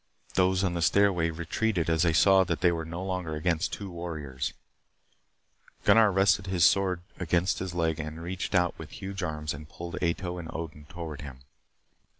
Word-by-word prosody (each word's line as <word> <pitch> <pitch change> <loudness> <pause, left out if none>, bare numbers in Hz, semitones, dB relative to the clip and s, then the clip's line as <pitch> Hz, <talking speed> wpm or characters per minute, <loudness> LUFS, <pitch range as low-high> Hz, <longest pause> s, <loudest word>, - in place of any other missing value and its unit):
Those 95 0 +3
on 90 -2 +1
the 85 - -2
stairway 90 -1 +3
retreated 85 +3 -1
as 80 -1 +2
they 85 -1 +4
saw 95 +4 +6
that - - -2
they 90 -1 +5
were 80 -1 -3
no 85 +3 -5
longer 90 -4 -3
against 85 +3 0
two 100 -2 -5
warriors. 80 -6 -4 1.3
Gunnar 110 -2 +6
rested 95 +1 +3
his 90 -3 +3
sword 95 -3 +3 0.2
against 90 +2 +1
his 90 -1 -4
leg 80 -2 0
and 80 +1 -5
reached 90 +4 -4
out 90 -1 +3
with 80 -2 -8
huge 95 0 -6
arms 75 -3 -3
and 75 +2 -10
pulled 85 +3 -7
Ato 90 +1 -1
and 80 -2 -7
Odin 75 -3 -6
toward 80 -4 -6
him. 70 -3 -9
85 Hz, 175 wpm, -28 LUFS, 80-95 Hz, 1.3 s, saw